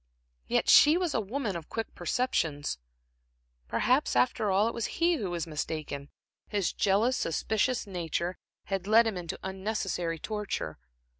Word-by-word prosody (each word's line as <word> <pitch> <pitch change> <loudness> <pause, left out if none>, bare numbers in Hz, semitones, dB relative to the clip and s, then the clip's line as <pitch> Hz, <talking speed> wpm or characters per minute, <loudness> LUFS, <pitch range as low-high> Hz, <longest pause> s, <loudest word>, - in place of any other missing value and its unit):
Yet - - +1
she 305 +3 +8
was 355 -4 0
a - - +1
woman 220 -1 -3
of 165 -2 -7
quick 225 -1 -4
perceptions. 160 - -1 0.9
Perhaps, 255 - +2
after 220 -4 +2
all, 195 +3 +3
it 230 - -2
was 235 - -2
he 335 0 +3
who 200 -8 -3
was 175 -1 -2
mistaken; 150 -2 -4 0.4
his 200 -5 -1
jealous, 210 +6 +2
suspicious 220 +8 0
nature 175 -1 -3 0.2
had 195 -1 -3
led 225 +2 +6
him 220 -3 -1
into 175 -2 -5
unnecessary 190 -3 -2
torture. 205 - -4
195 Hz, 145 wpm, -29 LUFS, 170-230 Hz, 0.9 s, she